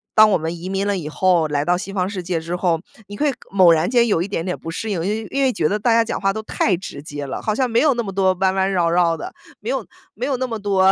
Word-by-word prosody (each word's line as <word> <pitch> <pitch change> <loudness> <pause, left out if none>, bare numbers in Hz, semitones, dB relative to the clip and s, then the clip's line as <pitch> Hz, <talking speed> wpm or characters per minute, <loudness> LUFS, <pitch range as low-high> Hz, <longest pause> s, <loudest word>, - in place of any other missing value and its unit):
当 215 0 +8
我 - - +4
们 160 +1 -4
移 175 +3 -7
民 195 +1 -1
了 200 - 0
以 155 -4 -5
后， 175 0 +2
来 145 -1 -1
到 180 +2 +2
西 195 +2 -6
方 185 -2 0
世 200 -2 -4
界 175 -1 -2
之 165 +2 -4
后， 175 -2 +1 0.3
你 205 +1 -8
会 290 -2 +1 0.2
猛 185 -3 +6
然 160 +2 +1
间 235 -1 +3
有 200 -7 +2
一 180 - -2
点 180 -4 -3
点 180 - -2
不 165 - -8
适 220 +7 -4
应。 205 - -1
因 190 - -1
为 - - -9
因 275 - 0
为 265 - +3
觉 160 -10 0
得 210 +6 -1
大 235 +3 +2
家 230 0 +5
讲 - - -3
话 195 -1 +2
都 220 +2 -4
太 210 -2 +1
直 170 -5 -8
接 145 -1 -6
了， 135 - -5
好 215 - -1
像 255 +1 +1
没 230 0 +2
有 295 -2 +4
那 235 - -1
么 195 - -5
多 190 -1 +3
弯 190 0 +2
弯 190 0 +1
绕 175 -3 +2
绕 170 -1 +2
的， - - -7 0.3
没 - - -6
有 - - -1 0.3
没 - - -4
有 270 -3 0
那 260 - -1
么 225 -2 -4
多 195 -2 +3
190 Hz, 340 characters per minute, -21 LUFS, 170-215 Hz, 0.3 s, 当